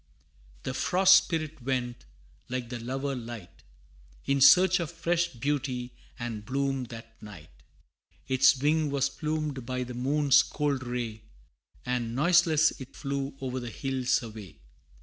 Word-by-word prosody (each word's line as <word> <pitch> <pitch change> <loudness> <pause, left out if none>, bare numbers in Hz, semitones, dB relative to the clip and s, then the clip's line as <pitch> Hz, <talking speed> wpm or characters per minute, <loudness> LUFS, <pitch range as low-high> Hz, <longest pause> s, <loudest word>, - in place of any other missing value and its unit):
The 130 - -3
Frost 190 +7 +5
Spirit 155 -3 -4
went, 125 - -3 0.4
like 125 -2 -4
the 120 -1 -5
lover 135 +4 -3
light, 115 -6 -9 0.6
In 140 0 +1
search 185 +6 +7
of 170 -3 -3
fresh 170 0 0
beauty 130 -1 -3 0.3
and 115 -4 -5
bloom 135 +2 -1
that 115 -1 -12
night 95 -7 -12 0.8
Its 130 +1 +4
wing 150 +2 +2
was 140 -1 +1
plumed 155 -4 -3
by 125 +1 -3
the 125 0 -7
moon's 140 +3 +3
cold 145 -3 -2
ray, 120 -3 -4 0.6
And 120 -2 -2
noiseless 160 0 +4
it 130 - -10
flew 140 -1 -4
o'er 130 0 -3
the 120 -1 -6
hills 130 +1 -1
away. 110 -6 -10
130 Hz, 135 wpm, -28 LUFS, 120-150 Hz, 0.8 s, search